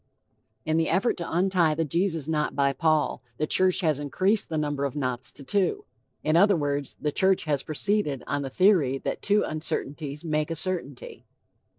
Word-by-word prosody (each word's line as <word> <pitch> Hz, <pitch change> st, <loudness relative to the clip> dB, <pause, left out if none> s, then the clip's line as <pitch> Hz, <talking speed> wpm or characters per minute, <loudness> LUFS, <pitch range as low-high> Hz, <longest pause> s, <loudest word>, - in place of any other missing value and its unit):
In 155 Hz, +1 st, +1 dB
the 165 Hz, -1 st, +1 dB
effort 195 Hz, +8 st, +1 dB
to 170 Hz, -, -5 dB
untie 175 Hz, -3 st, +2 dB
the 165 Hz, +1 st, 0 dB
Jesus 165 Hz, -1 st, 0 dB
knot 150 Hz, -2 st, -1 dB
by 140 Hz, -1 st, +2 dB
Paul, 155 Hz, -1 st, +1 dB, 0.2 s
the 155 Hz, -, 0 dB
church 185 Hz, +4 st, +3 dB
has 155 Hz, -5 st, +1 dB
increased 190 Hz, +9 st, +1 dB
the 160 Hz, -, -2 dB
number 145 Hz, -2 st, -2 dB
of 140 Hz, -3 st, -2 dB
knots 130 Hz, -3 st, -1 dB
to 140 Hz, -, -8 dB
two. 205 Hz, -, 0 dB, 0.4 s
In 155 Hz, +1 st, +1 dB
other 200 Hz, +3 st, +5 dB
words, 145 Hz, -3 st, -2 dB
the 150 Hz, -, -1 dB
church 190 Hz, +4 st, +2 dB
has 145 Hz, -4 st, -1 dB
proceeded 155 Hz, -2 st, -1 dB
on 145 Hz, 0 st, -2 dB
the 135 Hz, -, -4 dB
theory 170 Hz, -6 st, +3 dB
that -, -, -4 dB
two 205 Hz, +1 st, +2 dB
uncertainties 150 Hz, -1 st, -4 dB
make 155 Hz, -1 st, -1 dB
a 165 Hz, -, -2 dB
certainty. 160 Hz, -7 st, -4 dB
155 Hz, 185 wpm, -26 LUFS, 145-185 Hz, 0.4 s, other